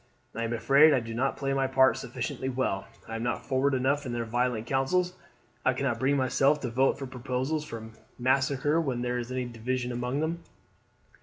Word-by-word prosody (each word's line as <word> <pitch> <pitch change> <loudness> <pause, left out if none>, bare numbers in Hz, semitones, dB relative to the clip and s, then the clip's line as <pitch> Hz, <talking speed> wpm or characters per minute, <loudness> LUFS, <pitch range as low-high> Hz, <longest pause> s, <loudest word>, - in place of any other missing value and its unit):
I 115 - -3
am 115 - -3
afraid 140 +6 +6
I - - +3
do 115 -1 -6
not 130 +4 0
play 135 -1 -1
my 135 -1 +1
part 130 0 +4
sufficiently 125 +1 -4
well. 125 -7 -1 0.2
I 115 - -5
am - - -5
not 120 - -2
forward 135 +1 +1
enough 140 +3 +1
in 125 -4 -4
their 120 -1 -2
violent 120 -1 0
councils. 175 +9 +1 0.5
I 130 - +3
cannot 130 -3 -1
bring 140 +3 +2
myself 135 +2 +3
to 125 - -3
vote 130 +3 +2
for 135 - -5
proposals 130 +4 -2
for 110 -3 -8 0.3
massacre 135 +4 +2
when 130 -6 -2
there 125 0 -1
is 120 +1 -5
any 130 -1 -2
division 125 +1 -3
among 125 +3 -2
them. 165 +2 -2
130 Hz, 200 wpm, -28 LUFS, 120-135 Hz, 0.5 s, afraid